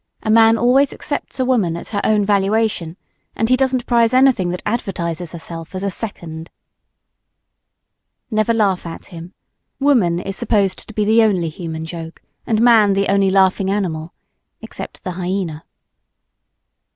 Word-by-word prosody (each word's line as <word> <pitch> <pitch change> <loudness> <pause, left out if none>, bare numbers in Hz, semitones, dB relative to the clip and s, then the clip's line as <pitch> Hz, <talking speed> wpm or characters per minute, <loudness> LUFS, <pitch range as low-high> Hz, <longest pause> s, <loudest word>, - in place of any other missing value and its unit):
A 215 - 0
man 225 0 +6
always 255 +4 +3
accepts 285 - -5
a 255 - +2
woman 210 -10 +1
at - - -9
her 205 -2 -2
own 210 -2 +2
valuation; 200 -4 0 0.4
and 225 - 0
he 255 - +5
doesn't 260 -1 0
prize 235 0 +3
anything 255 -9 +4
that 180 +1 -4
advertises 175 -6 -3
herself 165 0 -9
as 185 - -4
a 200 - -1
"second." 170 -6 -7 1.8
Never 215 +1 +1
laugh 200 -6 +1
at 165 - -8
him. 170 +3 -10 0.4
Woman 235 -12 +2
is 195 +1 -5
supposed 205 -5 0
to 220 - -11
be 210 - +1
the 220 +2 +4
only 190 -7 +2
human 160 -1 -6
joke 165 0 -8 0.3
and 220 -2 +1
man 220 -4 +5
the 195 0 0
only 195 -1 +3
laughing 190 0 +2
animal 170 -5 -2 0.5
except - - -9
the 185 - -3
hyena. 180 -3 -4
195 Hz, 150 wpm, -19 LUFS, 175-225 Hz, 1.8 s, man